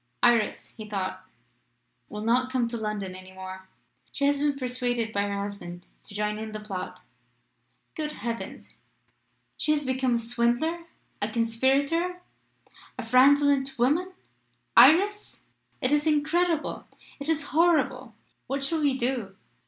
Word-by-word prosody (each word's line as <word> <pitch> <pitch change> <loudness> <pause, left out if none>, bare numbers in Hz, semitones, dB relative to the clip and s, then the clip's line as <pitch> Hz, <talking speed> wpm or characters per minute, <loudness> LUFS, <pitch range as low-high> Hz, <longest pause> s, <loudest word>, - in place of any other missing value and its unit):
"Iris," 235 -3 +3
he 215 -1 -8
thought, 195 -3 -3 0.9
"will 210 0 -6
not 250 +3 +2
come 250 -2 +1
to 235 - -4
London 210 -4 -3
any 185 0 -11
more. 190 0 -9 0.4
She 280 - -1
has 285 0 +2
been 290 -1 +1
persuaded 245 -3 -2
by 200 - +1
her 200 0 -2
husband 175 -4 -7 0.2
to 205 - -11
join 210 0 -1
in 220 0 -6
the 215 - -4
plot. 200 -3 -6 0.9
Good 300 -1 -4
heavens! 230 -1 -6 0.8
She 305 - +2
has 295 -1 -1
become 260 -1 +1
a - - +3
swindler 240 +9 0 0.4
a - - 0
conspirator 275 +10 +1 0.8
a - - -4
fraudulent 275 +2 +4
woman! 310 +10 +1 0.6
Iris! 410 +6 +5 0.4
it 255 - +1
is 295 +1 +2
incredible 315 +2 +1 0.3
it 280 +2 -4
is 315 -2 0
horrible! 265 -8 +2 0.3
What 275 +1 -2
shall 315 +3 0
we 280 -3 +2
do?" 240 -6 -2
255 Hz, 135 wpm, -27 LUFS, 220-290 Hz, 0.9 s, Iris